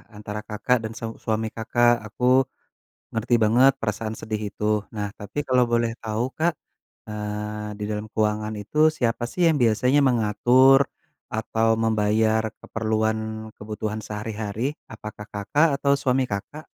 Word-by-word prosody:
antara 105 0 -6
Kakak 110 +4 0
dan 110 - -10
seu 115 -1 -6
suami 110 0 -1
Kakak, 120 +1 +2
aku 125 +4 +3 0.7
ngerti 115 +2 +1
banget 120 +5 +5
perasaan 110 0 -3
sedih 110 -1 -4
itu. 105 0 0
Nah, 105 -1 -4
tapi 105 +7 -9
kalau 125 -1 +4
boleh 115 -1 +1
tahu, 110 +2 -1
Kak, 160 -1 +1 0.5
eee, 105 0 -4
di 105 - -4
dalam 105 0 -3
keuangan 105 0 0
itu 105 +9 -6
siapa 120 -5 -1
sih 175 -2 +2
yang 160 - +5
biasanya 125 +5 +3
mengatur 125 +4 +5 0.5
atau 110 +1 0
membayar 110 0 +2 0.2
keperluan 110 0 0 0.4
kebutuhan 105 +1 -4
sehari-hari, 110 +5 -3 0.2
apakah 110 -1 -8
Kakak 145 +11 +2
atau 140 0 +2
suami 130 -1 +1
Kakak? 125 +10 -6
110 Hz, 135 wpm, -24 LUFS, 105-125 Hz, 0.7 s, banget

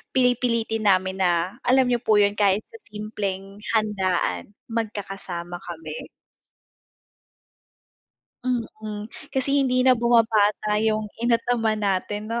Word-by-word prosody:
pili 250 -2 +3
pilitin 225 -3 0
namin 190 0 +2
na 180 +4 +1
alam 255 0 +4
niyo 240 - +2
po 220 -2 +2
yun 205 0 +3
kahit 200 +1 +3
sa 455 - -12
simpleng 205 -2 -5 0.2
handaan, 190 - 0 0.2
magkakasama 195 -6 -4
kami. 160 -3 -8 2.4
Mm, 220 -3 -4 0.2
kasi 265 0 0
hindi 255 -2 +2
na 255 -1 +5
bumabata 220 -3 +3
yung 215 -1 0
ina 235 +1 +2
at 230 - -1
ama 225 -3 +2
natin 205 +1 -2
no. 235 +1 -1
215 Hz, 120 wpm, -24 LUFS, 195-230 Hz, 2.4 s, na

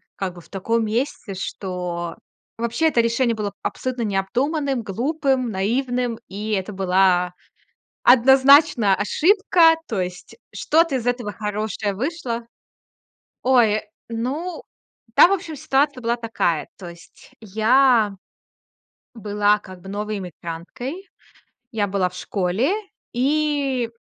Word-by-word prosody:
как 190 -2 -4
бы 175 - -11
в - - -21
таком 225 +4 -1
месте, 225 -1 -2
что 180 -3 -4 0.4
вообще 235 +8 0
это 305 - +1
решение 230 +1 +1
было 205 -2 -3
абсолютно 255 -2 -3
необдуманным, 255 +7 -1
глупым, 255 - -1
наивным, 245 +4 -1
и 210 +3 -5
это 195 +1 -2
была 185 -1 +2 0.7
однозначно 265 -3 +6
ошибка. 335 - +4
То 210 -5 -2
есть 180 0 -6 0.2
что-то 330 -2 +2
из 245 -2 -4
этого 245 -3 -1
хорошее 210 0 -3
вышло 250 - -3 1.0
Ой, 230 -5 +4 0.3
ну, 265 +10 -4 0.5
там, - - +7
в - - +2
общем, 330 -4 -6
ситуация 280 -2 +1
была 235 0 0
такая. 225 -9 -1
То 180 - -8
есть 170 0 -15
я 220 +1 +3 1.0
была 210 -1 +1
как 185 -3 -13
бы 190 - -12
новой 210 +1 -3
эмигранткой. 190 - -7 0.6
Я 210 -3 0
была 190 -2 0
в 180 - -15
школе, 195 - -1 0.4
и 275 -2 0
230 Hz, 115 wpm, -22 LUFS, 195-265 Hz, 1.0 s, там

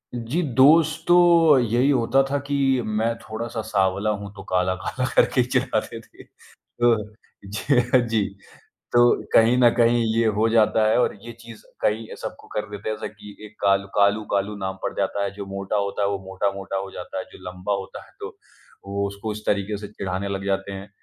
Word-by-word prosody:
जी, 120 +8 -2
दोस्त 150 +3 +4
तो 175 - +6 0.4
यही 120 +3 +2
होता 135 0 +3
था 145 - 0
कि 145 0 -2 0.3
मैं 110 +2 0
थोड़ा-सा 115 +1 -5
साँवला 100 -1 0
हूँ, 100 -1 -4
तो - - -10
काला-काला 95 +7 -1
करके 130 - +4
ही 125 - -2
चिढ़ाते 125 -3 -1
थे, - - -17 0.4
तो 120 -1 +1 0.6
ज 125 0 +2
जी। 110 -2 +1 0.7
तो 120 - +5 0.3
कहीं 115 +2 +5
न 120 -1 +6
कहीं 120 0 +3
ये 115 0 +3
हो 110 +2 +2
जाता 110 -1 +3
है 110 - +3
और - - +1
ये 120 - -8
चीज़ 115 -1 -12 0.2
कहीं 110 +1 0
सबको - - -8
कर 105 0 -4
देते 105 0 -6
हैं, 110 - -2
ऐसा - - -6
कि 105 -1 -11
एक 105 - -17
कालू 100 0 +2
कालू 100 +1 +3
कालू 100 +1 0
नाम 95 -1 -4
पड़ - - -2
जाता 100 - -1
है, 100 - -2
जो 100 -1 -7
मोटा 100 +1 -3
होता 100 0 -1
है 100 - +2
वो 100 -1 -2
मोटा-मोटा 95 0 -3
हो 95 0 -4
जाता 95 +1 -7
है, - - -4
जो - - -13
लंबा 90 +3 -4
होता 95 -1 -8
है - - -21
तो - - -8 0.5
वो 100 0 -2
उसको 100 +2 -5
इस 105 - -8
तरीके 100 +1 0
से 105 0 -8
चिढ़ाने 100 -1 -4
लग 100 0 -4
जाते 95 0 -2
हैं। 95 +1 -8
105 Hz, 195 wpm, -23 LUFS, 100-120 Hz, 0.7 s, तो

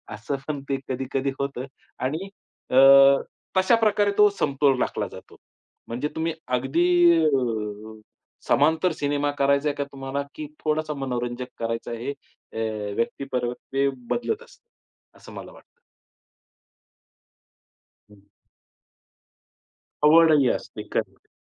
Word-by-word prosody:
असं 115 +7 -4
पण 145 -2 -3
ते 135 - +1
कधी-कधी 135 +1 -2
होतं. 140 -2 -3 0.3
आणि 155 +9 -3 0.4
अ, - - 0 0.8
तशाप्रकारे 205 +1 +3
तो 210 0 +7
समतोल 135 -2 +2
राखला - - -1
जातो. - - -13 0.5
म्हणजे 125 +5 -3
तुम्ही 160 +1 -1 0.2
अगदी 135 +7 0 0.4
अ, 110 -6 -2 0.5
समांतर 160 +5 +3
सिनेमा 145 -1 -1
करायचा 140 +1 +2
आहे 145 - -3
का 145 - -2
तुम्हाला? 135 0 -4
की 155 - -6 0.2
थोडंसं 155 0 -1
मनोरंजक 125 -1 -3
करायचं, 115 0 -3
हे 115 +4 -4 0.4
अ, 110 -2 -3
व्यक्तिपर 125 0 -2
ते 135 +2 -1 0.2
बदलत 435 - -2
असतं, 480 - -21 0.5
असं - - -14
मला - - -9
वाटतं. 480 - -20 2.3
हं. 105 -1 -18 1.8
आवडही 155 -3 +6
असते. - - -7
करेक्ट. - - -3
140 Hz, 110 wpm, -24 LUFS, 125-155 Hz, 2.3 s, तो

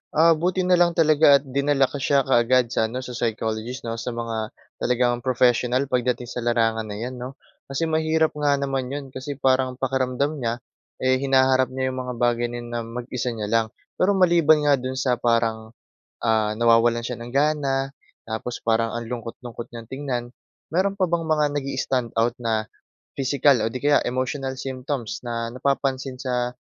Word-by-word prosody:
ah, 165 +2 +6
buti 180 +3 +1
na 180 -1 +3
lang 170 -1 +3
talaga 155 -3 +6
at - - -21
dinala 140 0 +1
ko 145 - -6
siya 140 +1 +2
kaagad 125 -1 +3
sa 110 - +1
ano, 125 +3 -5
sa 125 - -7
psychologist, 115 +1 -3
‘no? 115 0 -4
Sa 115 +1 -4
mga 115 -1 -4 0.3
talagang 120 0 +1
professional 125 +1 +2
pagdating 125 -1 0
sa - - -4
larangan 115 -2 +1
na 105 - -6
‘yan, 125 +4 -5
‘no? 125 +2 -7 0.3
Kasi 135 +4 -2
mahirap 160 0 +2
nga 145 -1 +3
naman 135 -2 -2
‘yon, 145 0 -4
kasi 135 +2 -6
parang 130 -1 +1
pakiramdam 130 +3 -1
niya, 115 -2 -1 0.5
eh, 130 0 +3
hinaharap 130 -1 +3
niya 130 0 -1
‘yong 130 - -5
mga 125 - -4
bagay 120 0 +1
na 120 - -7
'yon 120 - -9
na 120 - -2
mag-isa 125 +1 -4
niya 105 -2 -4
lang. 115 -1 +3 0.3
Pero 200 +2 +3
maliban 170 -5 +4
nga 145 -2 +4
do’n 130 +1 -4
sa 130 -2 0
parang, 115 -1 0 0.4
ah, 110 -2 +1
nawawalan 115 0 +4
siya 125 - -3
ng 120 - -9
gana, 140 -1 +1 0.4
tapos 115 +2 -4
parang 115 0 +1
ang 120 0 -4
lungkot-lungkot 120 0 -7
niyang 115 -1 -9
tingnan. 130 -3 -3 0.5
Meron 190 +4 +1
pa - - +3
bang 170 0 0
mga 155 -1 +3
nag-i-standout 125 -4 -1
na 110 -2 0 0.5
physical 135 -1 +2
o 110 - +1
di 115 - -7
kaya 145 0 +4
emotional 130 +1 -2
symptoms, 130 -2 -4
na 115 -1 -4
napapansin 135 0 -1
sa 125 -1 -2
130 Hz, 175 wpm, -23 LUFS, 120-140 Hz, 0.5 s, ah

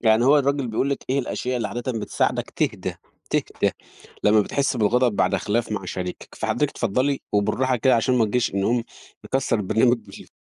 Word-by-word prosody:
يعني 110 +1 +4
هو 145 +2 +6
الراجل 140 -1 0
بيقول 130 +5 0
لِك 140 - -3
إيه 140 - +2
الأشياء 125 -1 -2
اللي 110 -4 -2
عادةً 120 +4 -3
بتساعدك 110 -2 -1
تهدا - - -2 0.3
تهدا - - 0 0.5
لمّا 105 +1 +6
بتحس 135 +5 0
بالغضب 115 0 +2
بعد 95 +1 +2
خِلاف 110 +4 -1
مع 100 -2 -3
شريكَك، 90 0 -6
فحضرتِك 115 +6 0
اتفضلي 130 +5 0
وبالراحة 125 +5 +1
كده 130 +3 +3
علشان 120 +3 +2
ما 115 - +4
نجيش 115 -1 0
نقوم 115 +4 +1 0.4
نكسّر 135 -3 0
البرنامج 115 +5 +3
بال - - -13
120 Hz, 175 wpm, -23 LUFS, 105-130 Hz, 0.5 s, هو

